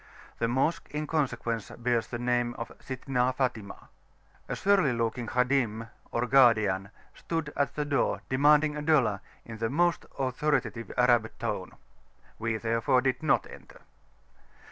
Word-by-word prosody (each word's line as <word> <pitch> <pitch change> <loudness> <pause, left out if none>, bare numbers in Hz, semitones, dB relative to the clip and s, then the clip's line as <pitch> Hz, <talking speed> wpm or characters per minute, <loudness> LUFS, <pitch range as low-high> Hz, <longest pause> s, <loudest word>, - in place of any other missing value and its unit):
The 115 - +1
Mosque 135 +8 0
in 150 +1 -1
consequence 125 -8 -2
bears 120 -1 0
the 120 - -5
name 120 0 0
of 115 -1 -6
Sittna 130 -1 -1
Fatimah. 120 -7 -3 0.6
A - - -2
surly 195 -9 +3
looking 115 0 -2
Khadim, 120 -3 0 0.2
or 120 +1 -1
guardian 110 -7 +4 0.2
stood 165 -3 -4
at 140 - -1
the 150 - -1
door 145 -1 0
demanding 150 +3 +4
a 150 - -4
dollar 135 -10 +2 0.2
in 115 -1 -9
the 115 0 -1
most 175 +5 +1
authoritative 130 -3 -1
Arab 120 -3 +4
tone - - -4 0.7
we 110 0 -1
therefore 115 +4 +1
did 130 +2 0
not 150 -3 +2
enter. - - -14
125 Hz, 140 wpm, -28 LUFS, 115-140 Hz, 0.7 s, guardian